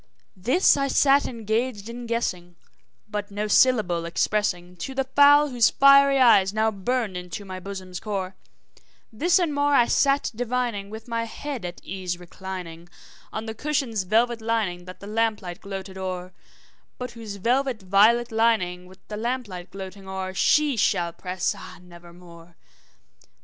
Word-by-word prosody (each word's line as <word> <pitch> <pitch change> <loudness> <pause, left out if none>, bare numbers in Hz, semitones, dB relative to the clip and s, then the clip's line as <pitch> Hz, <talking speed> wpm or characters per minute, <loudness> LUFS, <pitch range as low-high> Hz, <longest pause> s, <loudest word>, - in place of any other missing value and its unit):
This 250 - +3
I 275 0 0
sat 275 +1 +4
engaged 225 -1 -2
in 235 +1 -7
guessing, 180 -7 -3 0.5
but 210 -1 -4
no 205 +1 -3
syllable 210 -7 +3
expressing 180 0 -1
To 265 +10 -6
the 270 - +1
fowl 285 +2 +5
whose 240 -3 +4
fiery 275 0 +6
eyes 215 -6 +5
now 220 0 +2
burned 215 0 -2
into 180 +2 -6
my 185 -1 -7
bosom's 185 -1 -7
core; 195 -3 -4 0.8
This 340 - +3
and 340 -5 0
more 285 0 +2
I 240 - +5
sat 275 +3 +2
divining, 240 -4 -2
with 220 +2 -9
my 230 -1 -2
head 255 -1 -6
at 175 0 -6
ease 180 -1 -4
reclining 175 -1 -8 0.4
On 220 - -5
the 220 - -5
cushion's 260 -4 -1
velvet 225 +5 +1
lining 215 -6 -1
that 185 0 -11
the - - -9
lamp 220 +1 0
light 175 +2 -7
gloated 190 -1 -7
o'er, 185 -1 -5 0.6
But 250 0 -5
whose 225 -3 -8
velvet 245 +2 0
violet 220 +6 +4
lining 210 -6 +1
with 185 +1 -19
the 210 - -6
lamp 245 +2 -2
light 180 -2 -8
gloating 195 0 -9
o'er, 190 0 -4
She 290 +6 +3
shall 170 -4 +1
press, 180 0 -2
ah, 185 - -11
nevermore! 175 -1 -15
210 Hz, 155 wpm, -24 LUFS, 185-245 Hz, 0.8 s, fiery